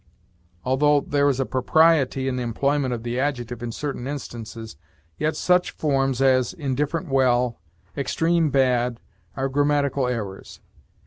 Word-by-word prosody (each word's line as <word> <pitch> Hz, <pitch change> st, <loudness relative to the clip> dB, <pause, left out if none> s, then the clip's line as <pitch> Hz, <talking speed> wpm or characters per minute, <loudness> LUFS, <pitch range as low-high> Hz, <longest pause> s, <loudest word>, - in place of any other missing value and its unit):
Although 145 Hz, +3 st, +3 dB
there 145 Hz, 0 st, +1 dB
is 135 Hz, -2 st, -1 dB
a 135 Hz, -, +1 dB
propriety 135 Hz, 0 st, +2 dB
in 130 Hz, -, -1 dB
the 125 Hz, -, -2 dB
employment 135 Hz, +3 st, 0 dB
of 115 Hz, -2 st, -4 dB
the 120 Hz, +1 st, -2 dB
adjective 125 Hz, -4 st, -2 dB
in 120 Hz, -1 st, -4 dB
certain 135 Hz, 0 st, -5 dB
instances, 115 Hz, -, -7 dB, 0.4 s
yet 155 Hz, +1 st, 0 dB
such 180 Hz, 0 st, +2 dB
forms 135 Hz, -3 st, 0 dB
as 130 Hz, -2 st, +3 dB
'indifferent 145 Hz, +1 st, -2 dB
well,' 125 Hz, -3 st, +2 dB, 0.4 s
'extreme 165 Hz, +3 st, +1 dB
bad,' 125 Hz, -3 st, +1 dB, 0.4 s
are 135 Hz, 0 st, 0 dB
grammatical 140 Hz, -1 st, +1 dB
errors. 105 Hz, -6 st, -5 dB
135 Hz, 135 wpm, -23 LUFS, 125-145 Hz, 0.4 s, Although